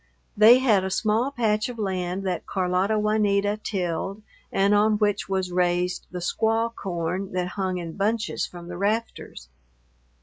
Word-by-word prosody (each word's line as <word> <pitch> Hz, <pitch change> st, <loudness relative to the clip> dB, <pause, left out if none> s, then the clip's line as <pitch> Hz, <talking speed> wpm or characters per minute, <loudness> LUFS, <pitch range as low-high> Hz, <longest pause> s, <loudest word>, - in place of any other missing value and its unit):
They 220 Hz, +4 st, +8 dB
had 225 Hz, -7 st, +3 dB
a 190 Hz, -, -2 dB
small 220 Hz, +6 st, +1 dB
patch 220 Hz, -4 st, 0 dB
of 245 Hz, -, -7 dB
land 190 Hz, -2 st, -2 dB
that 185 Hz, -2 st, -3 dB
Carlota 185 Hz, +3 st, 0 dB
Juanita 210 Hz, -1 st, +1 dB
tilled 195 Hz, +1 st, -3 dB, 0.3 s
and 200 Hz, +1 st, +2 dB
on 210 Hz, +1 st, +3 dB
which 205 Hz, -2 st, 0 dB
was 190 Hz, -2 st, -1 dB
raised 180 Hz, 0 st, 0 dB
the 180 Hz, -, -7 dB
squaw 225 Hz, +6 st, 0 dB
corn 185 Hz, -1 st, -4 dB
that 180 Hz, -1 st, -1 dB
hung 185 Hz, -1 st, -2 dB
in 170 Hz, -2 st, -6 dB
bunches 220 Hz, +3 st, -1 dB
from 175 Hz, -1 st, -11 dB
the 175 Hz, 0 st, -7 dB
rafters. 210 Hz, -, -3 dB
195 Hz, 155 wpm, -25 LUFS, 180-215 Hz, 0.3 s, They